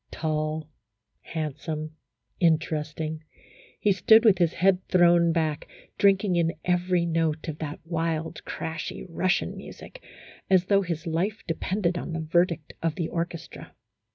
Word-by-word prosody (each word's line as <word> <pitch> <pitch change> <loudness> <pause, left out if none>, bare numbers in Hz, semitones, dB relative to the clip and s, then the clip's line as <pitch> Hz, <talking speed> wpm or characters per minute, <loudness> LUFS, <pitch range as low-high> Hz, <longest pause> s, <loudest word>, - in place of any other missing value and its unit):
Tall, 155 -1 -2 0.5
handsome, 155 0 -5 0.4
interesting, 155 -1 0 0.6
he 210 - +3
stood 220 +5 +5
with 200 -5 +6
his 170 -2 +3
head 185 0 +2
thrown 175 -1 +5
back, 160 -3 -1 0.3
drinking 195 -2 +3
in 165 -1 +2
every 180 -1 +1
note 160 -2 0
of 155 -1 -5
that 150 -1 -5
wild, 165 -1 -2
crashy 160 0 -5
Russian 180 +2 0
music, - - -11 0.5
as 185 -1 +4
though 200 +1 +4
his 170 -4 -4
life 180 +7 -1
de 165 - -1
pended 180 0 -1
upon 170 - -5
the 165 - -2
verdict 165 0 0
of 165 -2 0
the 170 -3 -2
orchestra. 170 -1 -5
165 Hz, 135 wpm, -26 LUFS, 160-180 Hz, 0.6 s, with